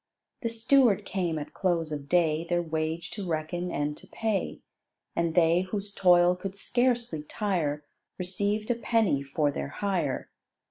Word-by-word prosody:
The 230 - -1
steward 230 -3 +3
came 175 -4 -1
at 145 - -6
close 170 -4 0
of 145 -1 -5
day 165 -2 +3
Their 175 0 +1
wage 160 +1 -3
to 200 -3 -5
reckon 165 +3 -2
and 150 -2 -1
to - - -13
pay; 220 -3 -2 0.5
And 170 -1 0
they 170 0 +5
whose 200 +2 -4
toil 180 -2 +5
could 190 +1 -6
scarcely 240 -5 +1
tire, 150 -4 -2 0.3
Received 205 +5 -1
a - - +2
penny 225 - +1
for 145 +1 0
their - - -4
hire. 170 -3 -2
175 Hz, 150 wpm, -28 LUFS, 155-205 Hz, 0.5 s, they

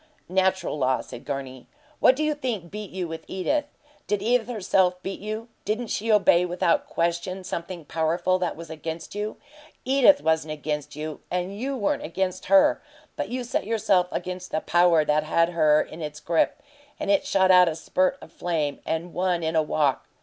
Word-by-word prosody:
"Natural 190 -3 +1
law," 130 -1 +2
said 120 - -11
Gurney. 130 -2 -5 0.3
"What 255 - +6
do 305 - -1
you 305 0 +1
think 235 - -4
beat 210 -1 -6
you 185 -1 -4
with 160 0 -7
Edith? 285 +11 -1 0.4
Did 205 -1 -1
Edith, 235 0 +2
herself, 190 -5 +1
beat 195 - -4
you? 215 +3 -5 0.2
Didn't 220 +2 -2
she 225 +2 0
obey 195 -4 +5
without 175 -1 +1
question 170 +3 -2
something 170 -2 -5
powerful 170 +4 0
that 180 -1 -1
was 165 0 -9
against 160 +1 -6
you? 210 +1 -4 0.5
EDITH 275 +2 +5
wasn't 160 -1 +1
against 150 -1 -4
you, 155 0 -5
and 180 +2 -2
you 265 +5 -3
weren't 205 -4 0
against 185 +2 -3
HER, 290 +1 +5 0.3
but - - -3
you 250 0 -3
set 240 - -2
yourself 205 -5 +2
against 180 0 -5
the 155 - -1
power 175 -3 +4
that 150 0 +2
had 165 +2 +2
her 155 -3 +4
in 160 - -10
its 150 -1 -5
grip, 165 +2 0 0.4
and 200 - 0
it 200 - +3
shot 190 -1 +4
out 180 -1 +7
a 160 - -4
spurt 185 +3 0
of - - -13
flame 160 -5 -2
and 165 +2 -2
won 180 -1 0
in 160 +1 -1
a 160 - +5
walk! 150 -3 0
180 Hz, 185 wpm, -25 LUFS, 160-205 Hz, 0.5 s, out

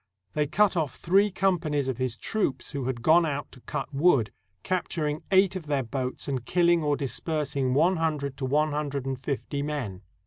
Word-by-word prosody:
They 150 -1 +1
cut 205 +6 +3
off 155 -6 -1
three 195 +4 +3
companies 170 -8 0
of 130 -1 -2
his 130 -3 -1
troops 140 - -2
who 140 -3 -3
had 120 -3 -3
gone 165 +4 +6
out 145 -3 -3
to 125 - -15
cut - - -5
wood, 140 -6 +3 0.3
capturing 155 -4 -1
eight 190 0 +4
of 175 -5 -6
their 140 -2 +1
boats, 130 +2 -4
and 130 -4 -2
killing 170 +3 +3
or 145 -2 +1
dispersing 140 -2 -1
one 170 +5 +4
hundred 150 -4 -1
to 135 - -3
one 150 +3 +2
hundred 145 -2 -2
and 135 -1 -3
fifty 140 +2 -3
men. 135 -11 -4
145 Hz, 185 wpm, -27 LUFS, 135-165 Hz, 0.3 s, gone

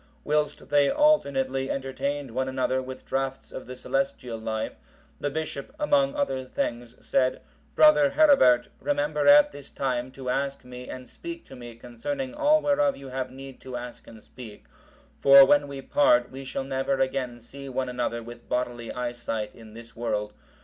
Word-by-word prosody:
Whilst 150 0 -1
they 145 -1 +4
alternately 135 - +2
entertained 135 0 -3
one 130 +3 -1
another 130 0 0
with 130 0 -9
draughts 135 0 -3
of - - -8
the 130 - -7
celestial 125 -3 -2
life, 110 0 -3 0.5
the 145 - -1
bishop, 155 - -5
among 290 -2 +2
other 280 - -1
things, 120 -1 -4
said, 130 -1 +1 0.4
"Brother 305 -2 +6
Herebert, 275 - +5
remember 290 0 0
at 295 0 +7
this 140 - -11
time 125 -2 -2
to 130 -1 -4
ask 140 0 -2
me 125 0 -9
and 130 0 -8
speak 340 -1 -9
to 135 - -12
me 120 -2 -10
concerning 260 - -5
all 300 +1 +3
whereof 285 -1 +2
you 135 -1 -10
have 130 0 -3
need 135 0 -11
to 130 -1 -6
ask 120 0 -9
and 110 -1 -13
speak; 115 -5 -12 0.5
for, 140 0 +9
when 145 +1 +3
we 140 -1 -7
part, 295 - +3
we 135 +1 -8
shall 135 - -3
never 135 0 -1
again 130 -2 -1
see 140 +4 -10
one 130 0 -2
another 120 -1 -3
with 120 +1 -12
bodily 120 -2 -2
eyesight 120 -3 -4
in 110 -2 -14
this 115 0 -12
world. 105 -3 -2
135 Hz, 170 wpm, -26 LUFS, 125-145 Hz, 0.5 s, for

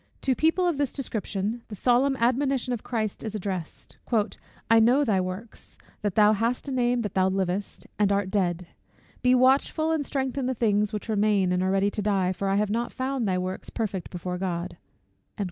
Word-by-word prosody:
To 265 - +2
people 325 +7 +2
of 325 -5 0
this 285 -3 0
description, 220 -3 -3
the 210 - -7
solemn 255 +5 +3
admonition 255 +1 +1
of 235 - -3
Christ 220 -4 -3
is 220 -1 -4
addressed; 185 -5 -5 0.7
"I 230 0 +6
know 250 +6 +4
thy 195 -6 +2
works; 185 +5 -7 0.2
that 205 -2 -2
thou 210 0 +6
hast 230 +6 -1
a - - -3
name 245 -1 +1
that 210 -4 -4
thou 190 0 +3
livest, 190 +1 -2
and 205 -1 +3
art 200 -1 0
dead. 180 -3 0 0.6
Be 250 0 +4
watchful, 270 +5 +3
and 315 -2 +1
strengthen 265 -1 -2
the 260 - -1
things 210 -2 +1
which 210 0 -5
remain 210 -3 +2
that 180 0 +1
are 185 - +1
ready 195 +1 +2
to 210 - -3
die; 195 -3 +1
for 195 +1 -2
I 195 - +2
have 205 0 +1
not 235 +2 -1
found 260 -3 -2
thy 185 -1 +1
works 185 +1 -4
perfect 195 -6 -3
before 180 0 -5
God." 180 -1 -3
215 Hz, 195 wpm, -26 LUFS, 195-250 Hz, 0.7 s, I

